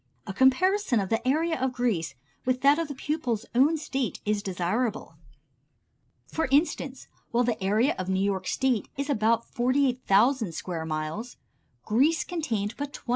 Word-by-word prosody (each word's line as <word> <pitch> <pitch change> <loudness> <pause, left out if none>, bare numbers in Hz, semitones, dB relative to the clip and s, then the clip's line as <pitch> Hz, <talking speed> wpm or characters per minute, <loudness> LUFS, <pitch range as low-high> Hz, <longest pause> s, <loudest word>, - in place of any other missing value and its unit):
A 195 - -5
comparison 265 - +3
of 195 -2 -2
the 225 +2 -1
area 320 +1 +1
of 260 -1 0
Greece 200 - -1 0.3
with 255 0 0
that 285 +3 +5
of 330 - -1
the 285 - -6
pupil's 260 -6 -2
own 280 +7 +4
State 270 -5 -3
is 210 0 0
desirable. 205 +5 -2 1.1
For 320 - -2
instance, 275 -2 0 0.2
while 240 +1 +2
the 230 -5 -1
area 220 +9 +2
of 185 0 -3
New 190 0 +1
York 195 -2 -1
State 260 -5 0
is 280 +1 -1
about 230 -1 +2
48,000 250 -4 +2
square 165 -3 -4
miles, 155 +10 -4 0.5
Greece 280 +10 +2
contained 230 - -2
but 285 0 -5
21,000. - - -11
245 Hz, 155 wpm, -27 LUFS, 205-280 Hz, 1.1 s, that